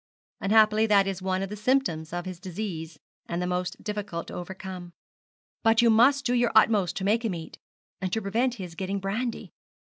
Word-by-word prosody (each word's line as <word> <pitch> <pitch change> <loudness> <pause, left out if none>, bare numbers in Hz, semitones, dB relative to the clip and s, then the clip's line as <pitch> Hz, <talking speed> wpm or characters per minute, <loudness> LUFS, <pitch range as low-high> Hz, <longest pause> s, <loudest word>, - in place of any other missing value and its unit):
'Unhappily, 215 +1 +4
that 200 -2 +5
is 195 -1 -3
one 185 0 -1
of 195 - -4
the 210 - -5
symptoms 210 -9 0
of 175 +1 -4
his 185 -2 -6
disease, 175 -4 -5 0.3
and 170 - -2
the 180 - -1
most 180 0 -3
difficult 205 -5 -4
to - - -10
overcome. 185 -1 -7 0.7
But 225 +1 +4
you 230 - +6
must 265 +5 +4
do 245 - +1
your 240 -1 +2
utmost 205 -5 +4
to - - -3
make 220 +4 +2
him 215 -6 -1
eat, 165 -1 -9 0.4
and 185 -1 -2
to 225 - 0
prevent 235 +5 0
his 185 -6 -7
getting 190 +3 -3
brandy. 225 +5 -3
195 Hz, 190 wpm, -27 LUFS, 180-225 Hz, 0.7 s, you